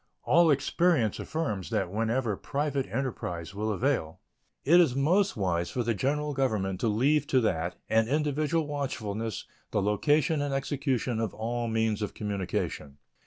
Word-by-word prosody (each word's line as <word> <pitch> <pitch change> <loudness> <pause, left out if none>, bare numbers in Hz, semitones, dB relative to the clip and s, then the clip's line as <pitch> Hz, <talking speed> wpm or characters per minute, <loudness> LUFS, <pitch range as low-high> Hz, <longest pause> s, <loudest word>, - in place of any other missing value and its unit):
All 170 +1 +5
experience 145 - +2
affirms 125 - -3
that 100 -6 -1
wherever 115 +1 0
private 140 +2 -2
enterprise 100 -7 -4
will 105 +2 -2
avail 110 - -1 0.5
it 170 +5 +7
is 160 -8 +4
most 180 - +2
wise 85 -4 0
for 125 - -2
the 115 0 +1
General 145 +7 -1
Government 105 -9 0
to - - 0
leave 140 +7 +2
to 130 - +3
that 85 -5 -1
and 110 0 +3
individual 150 +2 +1
watchfulness 115 -8 -3 0.2
the - - 0
location 145 +9 +2
and 145 -1 -1
execution 135 -4 -1
of 110 -4 -2
all 120 +2 -2
means 110 -1 0
of 105 - -3
communication. 95 -8 -3
120 Hz, 150 wpm, -28 LUFS, 105-145 Hz, 0.5 s, it